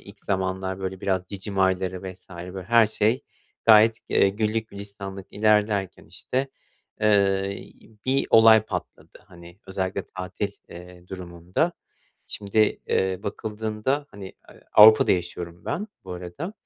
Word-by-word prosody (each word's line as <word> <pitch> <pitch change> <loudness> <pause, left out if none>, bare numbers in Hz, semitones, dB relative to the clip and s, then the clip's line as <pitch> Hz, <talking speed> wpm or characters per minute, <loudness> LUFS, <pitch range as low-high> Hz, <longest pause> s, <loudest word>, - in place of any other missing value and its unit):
ilk 100 0 -16
zamanlar, 95 -1 -2
böyle, 95 0 -5
biraz 95 -2 -1
cicim 100 0 -6
ayları 95 -1 +1
vs. 90 0 -20
böyle, 90 +2 -7
her 115 +2 +5
şey 110 +4 0 0.4
gayet, 110 0 +7
eee, 100 - +4
güllük 110 +2 -1
gülistanlık 100 -1 -8
ilerlerken, 105 -2 +1
işte, 130 +2 -3 0.5
eee, 100 -2 +1 0.3
bir 135 +1 +1
olay 110 -1 +7
patladı, 110 - -7
hani, 85 -2 -15
özellikle 95 0 -3
tatil, 95 +2 -5 0.2
eee, 90 0 -13
durumunda. 90 - -3 0.5
Şimdi, 100 +1 -3 0.3
eee, 95 -1 0
bakıldığında, 110 +7 -3
hani, 100 -1 -9 0.2
eee, - - -16
Avrupa'da 110 +1 +8
yaşıyorum 85 -1 -4
ben 205 +5 -3 0.2
bu 95 - -7
arada. 90 - -6
100 Hz, 125 wpm, -24 LUFS, 95-110 Hz, 0.5 s, Avrupa'da